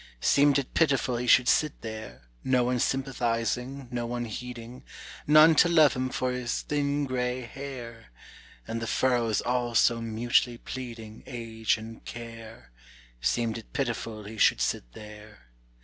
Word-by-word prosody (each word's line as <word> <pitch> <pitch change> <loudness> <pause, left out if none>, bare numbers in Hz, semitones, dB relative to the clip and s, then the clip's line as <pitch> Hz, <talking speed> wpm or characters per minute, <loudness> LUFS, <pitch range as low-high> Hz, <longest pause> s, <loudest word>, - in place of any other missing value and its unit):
Seemed 145 - +4
it 140 -2 -3
pitiful 135 -6 +2
he 125 +1 -3
should 125 +1 +6
sit 150 +2 +2
there, 110 - -8 0.2
No 130 -1 +2
one 125 0 0
sympathizing, 125 0 -1
no 120 -1 -2
one 120 0 -3
heeding, 120 +2 -8 0.4
None 155 +2 +8
to 175 - +6
love 155 -4 +5
him 130 0 -2
for 130 0 -1
his 125 -1 -3
thin 145 0 0
gray 125 -1 -2
hair, 120 -2 -8 0.6
And 115 +1 -3
the 115 - -3
furrows 120 -3 +1
all 120 -1 -1
so 115 0 +4
mutely 115 +1 +1
pleading 115 -4 -8
Age 115 -3 -1
and 110 +1 -10
care: 115 - -10 0.5
Seemed 110 - 0
it 115 - -17
pitiful 115 -5 -3
he 105 +2 -9
should - - +4
sit - - -2
there. 105 - -13
120 Hz, 150 wpm, -27 LUFS, 115-130 Hz, 0.6 s, None